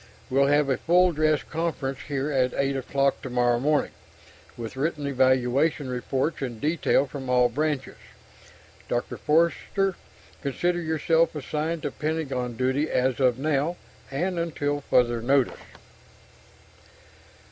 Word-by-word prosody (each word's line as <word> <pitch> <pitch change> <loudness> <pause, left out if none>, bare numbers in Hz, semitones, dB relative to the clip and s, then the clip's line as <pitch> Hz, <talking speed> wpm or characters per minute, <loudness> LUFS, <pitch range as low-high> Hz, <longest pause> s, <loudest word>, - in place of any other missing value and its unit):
We'll 140 +1 +4
have 145 0 +3
a 135 - +1
full 180 +2 +4
dress 155 -1 +1
conference 155 -5 -3
here 140 0 -2
at 130 -2 +1
8 140 0 0
o'clock 135 +1 0
tomorrow 120 -2 +1
morning, 150 +3 +1 0.7
with 115 +1 -6
written 150 +1 -2
evaluation 130 +2 +2
reports 130 +5 -2
in 125 -4 -4
detail 150 0 +2
from 135 -2 -7
all 125 -1 +4
branches. 145 +1 -2 0.9
Dr. 120 - -2
Forster, 170 +4 +1 0.5
consider 175 +5 -1
yourself 160 +1 +1
assigned 155 +3 -3
to - - -2
Pentagon 135 -6 -3
duty 130 +5 0
as 130 +1 +1
of 125 -3 +3
now, 150 +4 0 0.3
and 175 +6 -2
until 145 -3 -2
further 120 -3 +2
notice." 135 +1 +2
140 Hz, 125 wpm, -26 LUFS, 130-155 Hz, 0.9 s, We'll